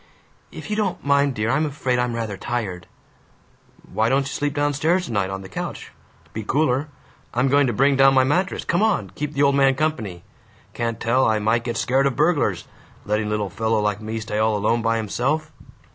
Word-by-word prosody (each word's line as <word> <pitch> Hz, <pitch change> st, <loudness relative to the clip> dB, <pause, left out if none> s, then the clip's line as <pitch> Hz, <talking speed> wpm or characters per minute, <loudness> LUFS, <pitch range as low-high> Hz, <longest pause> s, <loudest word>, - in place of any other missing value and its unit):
"If -, -, -8 dB
you -, -, +1 dB
don't 205 Hz, -8 st, -2 dB
mind, 140 Hz, -1 st, +2 dB
dear, 110 Hz, +2 st, 0 dB
I'm 155 Hz, +3 st, +1 dB
afraid 130 Hz, -3 st, -1 dB
I'm 125 Hz, -1 st, -1 dB
rather 110 Hz, -3 st, -3 dB
tired." 95 Hz, -5 st, -4 dB, 1.1 s
"Why 110 Hz, +3 st, +2 dB
don't 135 Hz, +2 st, +3 dB
you 140 Hz, -, -6 dB
sleep 145 Hz, 0 st, -2 dB
down 145 Hz, 0 st, +1 dB
stairs 170 Hz, +6 st, +1 dB
tonight, 100 Hz, -, -1 dB
on 95 Hz, 0 st, -5 dB
the -, -, -9 dB
couch? -, -, -6 dB, 0.4 s
Be 110 Hz, -, -4 dB
cooler. 140 Hz, +4 st, +1 dB, 0.5 s
I'm 125 Hz, +3 st, +2 dB
going 140 Hz, 0 st, +4 dB
to 120 Hz, -, 0 dB
bring 135 Hz, +4 st, +3 dB
down 135 Hz, 0 st, +6 dB
my 130 Hz, -, +5 dB
mattress. 180 Hz, +8 st, 0 dB
Come 175 Hz, +2 st, +1 dB
on! 220 Hz, -1 st, +1 dB
Keep 150 Hz, 0 st, -5 dB
the 140 Hz, 0 st, +1 dB
old 140 Hz, 0 st, +4 dB
man 135 Hz, -1 st, +4 dB
company. 115 Hz, -, -2 dB, 0.5 s
Can't 115 Hz, -1 st, -3 dB
tell 125 Hz, +3 st, +2 dB
I 110 Hz, -1 st, +2 dB
might 110 Hz, +2 st, +1 dB
get 120 Hz, -3 st, -3 dB
scared 135 Hz, +5 st, +2 dB
of 135 Hz, -, -2 dB
burglars. 145 Hz, -, +1 dB, 0.4 s
Lettin' 105 Hz, +1 st, 0 dB
little 105 Hz, -3 st, -2 dB
fellow 110 Hz, +2 st, 0 dB
like 105 Hz, 0 st, -1 dB
me 110 Hz, +1 st, -4 dB
stay 105 Hz, -1 st, -3 dB
all 110 Hz, -1 st, +2 dB
alone 115 Hz, +3 st, +1 dB
by 115 Hz, 0 st, +1 dB
himself!" 135 Hz, +8 st, -1 dB
125 Hz, 205 wpm, -22 LUFS, 110-145 Hz, 1.1 s, down